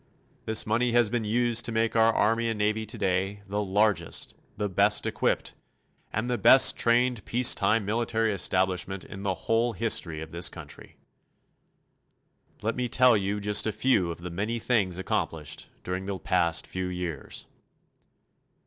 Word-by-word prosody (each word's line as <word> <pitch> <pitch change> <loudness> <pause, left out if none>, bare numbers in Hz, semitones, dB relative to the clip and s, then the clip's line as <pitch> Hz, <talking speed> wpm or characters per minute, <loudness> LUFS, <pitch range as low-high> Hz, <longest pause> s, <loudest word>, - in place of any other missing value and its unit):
This 110 0 +2
money 115 +2 0
has 120 -3 +3
been 120 -2 -1
used 120 +2 +1
to 120 - -1
make 115 0 0
our 115 0 +5
Army 115 +1 +1
and 110 - -3
Navy 110 +1 -1
today 95 +1 -2
the 105 +1 -2
largest, 100 -3 0 0.2
the 105 - -1
best 100 +2 +1
equipped, - - -1 0.6
and 110 +3 -2
the 125 -1 -1
best 130 - +7
trained 120 -2 +2
peace 125 +1 +3
time 105 +1 +1
military 115 0 0
establishment 95 0 -1
in 95 - -9
the 95 -2 -1
whole 115 +1 +1
history 90 -6 0
of 80 0 -8
this 85 +1 -1
country. - - -12 1.7
Let 115 +1 -1
me 125 -1 -2
tell 125 0 +4
you 100 0 -1
just 105 +1 +2
a - - 0
few 105 -8 +1
of 85 0 -7
the 90 0 -6
many 105 +7 -2
things 105 -7 0
accomplished 80 -4 -3
during 90 +1 -4
the 100 -1 -3
past 85 -1 0
few 95 0 -4
years. 90 -4 -5
105 Hz, 160 wpm, -27 LUFS, 95-115 Hz, 1.7 s, best